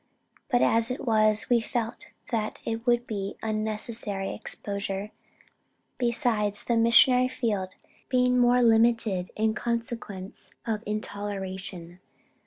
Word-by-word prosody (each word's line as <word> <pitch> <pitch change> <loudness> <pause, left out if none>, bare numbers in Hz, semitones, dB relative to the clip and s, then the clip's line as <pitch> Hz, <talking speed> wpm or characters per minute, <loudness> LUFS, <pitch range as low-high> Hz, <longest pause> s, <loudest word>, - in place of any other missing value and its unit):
But 245 -3 +3
as 230 0 +3
it 255 - -4
was, 215 -2 +3
we 240 -2 +3
felt 235 +6 -4 0.2
that 220 -2 -2
it 230 +2 -4
would 240 0 +3
be 200 -3 -4
unnecessary 215 -2 -2
exposure, 200 -1 -3 0.9
besides 230 -4 0
the 235 - 0
missionary 240 +2 +5
field 210 -7 -2 0.3
being 250 -1 +3
more 245 0 +4
limited 225 -5 +3
in 220 0 +1
consequence 230 -5 -5
of 220 -2 -1
intoleration. 190 -4 -5
220 Hz, 110 wpm, -27 LUFS, 205-235 Hz, 0.9 s, missionary